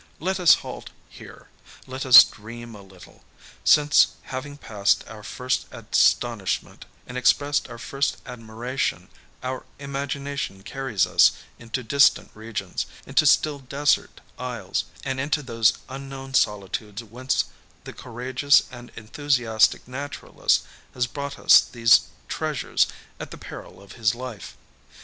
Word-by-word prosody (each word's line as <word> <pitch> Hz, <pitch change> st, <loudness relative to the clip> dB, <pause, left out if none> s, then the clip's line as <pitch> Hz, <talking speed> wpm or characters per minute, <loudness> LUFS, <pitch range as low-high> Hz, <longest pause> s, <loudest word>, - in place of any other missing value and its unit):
Let 190 Hz, +4 st, -2 dB
us 180 Hz, -, +7 dB
halt -, -, -8 dB, 0.2 s
here, -, -, -14 dB, 0.4 s
let 130 Hz, +1 st, -6 dB
us 125 Hz, -, +11 dB
dream 115 Hz, +2 st, -10 dB
a 105 Hz, -, -11 dB
little, 95 Hz, -2 st, -17 dB, 0.4 s
since 150 Hz, 0 st, +5 dB
having 140 Hz, +2 st, -7 dB
passed 105 Hz, -7 st, 0 dB
our 110 Hz, -1 st, -10 dB
first 125 Hz, +4 st, -3 dB
astonishment 115 Hz, -6 st, 0 dB, 0.2 s
and 125 Hz, 0 st, -5 dB
expressed 145 Hz, +4 st, +2 dB
our 120 Hz, -, -9 dB
first 135 Hz, +4 st, -2 dB
admiration, 120 Hz, +2 st, -4 dB, 0.3 s
our 130 Hz, 0 st, -4 dB
imagination 140 Hz, -6 st, -5 dB
carries 135 Hz, -4 st, -1 dB
us -, -, +5 dB, 0.3 s
into 120 Hz, +2 st, -5 dB
distant 140 Hz, +4 st, +3 dB
regions, 110 Hz, -4 st, -5 dB, 0.2 s
into -, -, +2 dB
still 150 Hz, -2 st, +3 dB
desert 140 Hz, +2 st, 0 dB, 0.2 s
isles, -, -, -3 dB, 0.2 s
and 135 Hz, -1 st, -2 dB
into 145 Hz, +2 st, -1 dB
those 115 Hz, -4 st, +2 dB
unknown 135 Hz, 0 st, -8 dB
solitudes 105 Hz, 0 st, -1 dB
whence 125 Hz, +4 st, -1 dB, 0.4 s
the -, -, -9 dB
courageous 130 Hz, +4 st, +1 dB
and 120 Hz, -1 st, -11 dB
enthusiastic 115 Hz, -2 st, +1 dB
naturalist 140 Hz, +2 st, -1 dB, 0.3 s
has 125 Hz, -, +1 dB
brought 140 Hz, +2 st, -6 dB
us -, -, +7 dB
these 115 Hz, -1 st, +4 dB, 0.2 s
treasures -, -, 0 dB, 0.3 s
at -, -, -7 dB
the -, -, -10 dB
peril -, -, -11 dB
of 100 Hz, -1 st, -15 dB
his 110 Hz, 0 st, 0 dB
life. 120 Hz, -5 st, -8 dB
125 Hz, 125 wpm, -24 LUFS, 115-140 Hz, 0.4 s, us